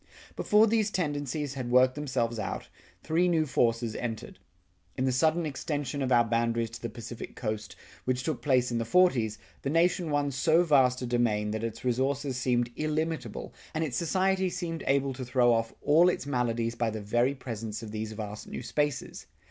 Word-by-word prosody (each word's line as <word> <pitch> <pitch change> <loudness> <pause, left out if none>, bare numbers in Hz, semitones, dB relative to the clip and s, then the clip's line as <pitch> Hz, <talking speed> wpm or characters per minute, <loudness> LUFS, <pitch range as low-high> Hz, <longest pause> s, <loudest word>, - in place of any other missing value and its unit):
Before 210 +1 +4
these 220 -1 +2
tendencies 145 -5 -2
had 130 -3 -4
worked 125 +1 +5
themselves 125 -5 -2
out, 105 - -4 0.3
three 165 +3 +2
new 165 -3 +2
forces 115 -4 +1
entered. 115 -2 -5 0.6
In 130 - +1
the 130 - +2
sudden 160 +6 +2
extension 145 -1 -3
of 130 -1 -1
our 120 -1 +6
boundaries 115 0 0
to 115 - -9
the 115 - -3
Pacific 115 0 -8
Coast, 110 -2 -4 0.3
which 125 0 0
took 145 -6 -2
place 125 -2 +2
in 120 - 0
the - - 0
forties, 120 - +3 0.2
the 140 - -2
nation 170 +2 +2
won 145 -1 +1
so 155 +6 +3
vast 130 -6 +3
a - - -1
domain 115 -4 +1
that 110 +1 -3
its 115 +1 -5
resources 135 +2 0
seemed 120 -1 0
illimitable 155 +1 -3 0.2
and 160 - +1
its 140 -6 -3
society 190 +4 +1
seemed 165 -2 -4
able 135 0 +2
to 130 +1 -6
throw 125 -1 +3
off 115 0 0
all 160 +5 +6
its 175 - -2
maladies 120 -4 0
by 120 -1 0
the 110 0 -4
very 120 +6 +1
presence 115 -4 -6
of 110 - -7
these 110 0 -4
vast 105 -1 -6
new - - -6
spaces. 145 -2 -2
130 Hz, 185 wpm, -29 LUFS, 115-150 Hz, 0.6 s, our